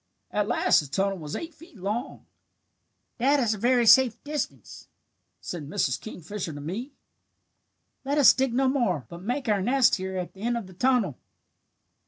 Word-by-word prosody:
At 210 -1 0
last 240 - +3
the 145 - -4
tunnel 195 +6 -1
was 150 -2 -6
eight 335 0 -6
feet 330 -2 -17
long. 210 +7 -4 0.9
"'That 280 +4 +3
is 230 -4 +1
a - - -5
very 245 +1 +3
safe 255 0 +6
distance,' 295 0 -5 0.5
said 155 -5 -6
Mrs. 130 -4 -1
Kingfisher 185 -3 -6
to 145 - -8
me. 205 - -5 1.1
'Let 280 +2 -1
us 285 - +8
dig 265 -1 0
no 265 +3 +2
more, 230 - 0
but 170 0 -9
make 250 +6 -3
our 205 -3 +2
nest 245 +3 +3
here 190 0 -4
at 180 -1 -5
the 195 - -14
end 235 +2 0
of 230 - -5
the 185 - -13
tunnel.' 235 - +1
225 Hz, 175 wpm, -26 LUFS, 185-260 Hz, 1.1 s, us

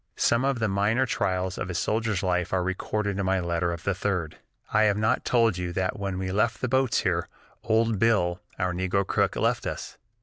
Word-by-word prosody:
Some 115 +2 +2
of 135 -1 +1
the 110 -1 0
minor 105 +6 +2
trials 95 -5 -1
of 90 - -3
a 90 - -4
soldier's 110 0 0
life 90 -2 0
are 95 -1 +1
recorded 100 +2 -2
in 100 - 0
my 95 0 +2
letter 85 0 -1
of 85 0 -6
the 100 - +1
3d: 90 -4 -2 0.4
"I 110 0 +5
have 105 -1 +2
not 110 +4 +1
told 115 -6 +2
you 90 -1 -3
that 95 +2 -1
when 100 -2 -3
we 95 0 -3
left 110 +4 +1
the 130 - -1
boats 130 0 +2
here, - - 0 0.4
old 110 -2 +2
Bill, 95 -6 +2 0.2
our 90 -1 0
negro 95 +2 0
cook, - - +1
left - - 0
us. - - -6
100 Hz, 210 wpm, -26 LUFS, 90-110 Hz, 0.4 s, I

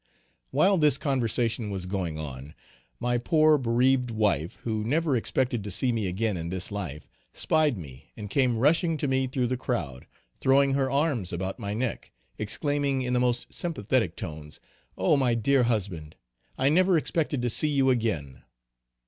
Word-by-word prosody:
While 195 -1 +3
this 150 -3 +4
conversation 120 -5 0
was 95 -2 -4
going 90 -4 -3
on, 70 -2 -7 0.4
my 120 0 0
poor 155 +4 +4
bereaved 125 +1 +2
wife, 100 -8 0
who 110 -2 -2
never 150 +4 +1
expected 125 -1 -1
to 105 - -5
see 110 +7 +1
me 110 -4 -1
again 100 +2 -1
in 85 0 -4
this 95 +2 -4
life, 95 -8 -5 0.3
spied 155 -6 +1
me 70 -7 -11
and 105 - -6
came 125 +2 +1
rushing 160 +6 +2
to 145 - -2
me 130 0 +1
through 130 -1 -1
the 125 +1 -1
crowd, 85 - -4 0.3
throwing 135 +1 +3
her 135 -1 +1
arms 140 - 0
about 95 +6 -4
my 100 -2 -3
neck 120 +1 -3 0.3
exclaiming 140 +4 0
in 125 0 -2
the 125 - +2
most 125 -1 -1
sympathetic 120 - -1
tones, 75 -5 -8 0.4
"Oh! 150 - +3
my 125 -4 +2
dear 125 +3 +2
husband! 95 -9 -2 0.4
I 135 - +3
never 180 +3 +4
expected 150 -4 -1
to 120 - +1
see 155 - +1
you 135 -3 +3
again!" 105 - -2
120 Hz, 165 wpm, -27 LUFS, 100-135 Hz, 0.4 s, this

